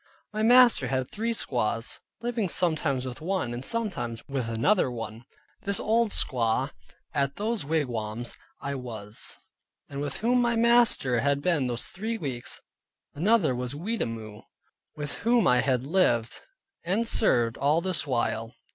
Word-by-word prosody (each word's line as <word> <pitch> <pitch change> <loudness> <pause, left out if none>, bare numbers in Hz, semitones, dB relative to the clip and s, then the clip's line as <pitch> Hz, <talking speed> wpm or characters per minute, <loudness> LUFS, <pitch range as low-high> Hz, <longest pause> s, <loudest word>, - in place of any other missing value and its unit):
My 215 - -2
master 240 - +6
had 130 0 -2
three 230 +2 -1
squaws, 120 - -2 0.2
living 235 -5 -1
sometimes 155 -7 0
with 125 +1 -7
one, 175 -8 -1
and 120 +2 -5
sometimes 175 - -2
with 135 -5 -2
another 130 - +2
one, 115 -1 -7 0.4
this 200 0 +1
old 225 +1 +2
squaw, 125 - +1 0.4
at 140 -2 0
whose 215 -4 -1
wigwam 120 -7 -2 0.4
I 140 - -3
was, 115 -5 -3 0.5
and 140 0 -6
with 145 -1 -3
whom 245 +2 +3
my 235 -1 +2
master 230 - +4
had 140 +2 +1
been 150 -4 +1
those 120 -1 -1
three 225 +4 -3
weeks. 130 - -4 0.5
Another 180 - +3
was 125 +2 -3
Wattimore 115 - -4
[Weetamoo] - - -31 0.5
with 145 -1 -4
whom 235 +1 +3
I 125 - +5
had 130 -3 +1
lived 125 -8 +1 0.4
and 205 +7 0
served 120 - +3
all 145 +4 +3
this 180 -4 0
while. 115 -3 -1
140 Hz, 145 wpm, -27 LUFS, -, 0.5 s, master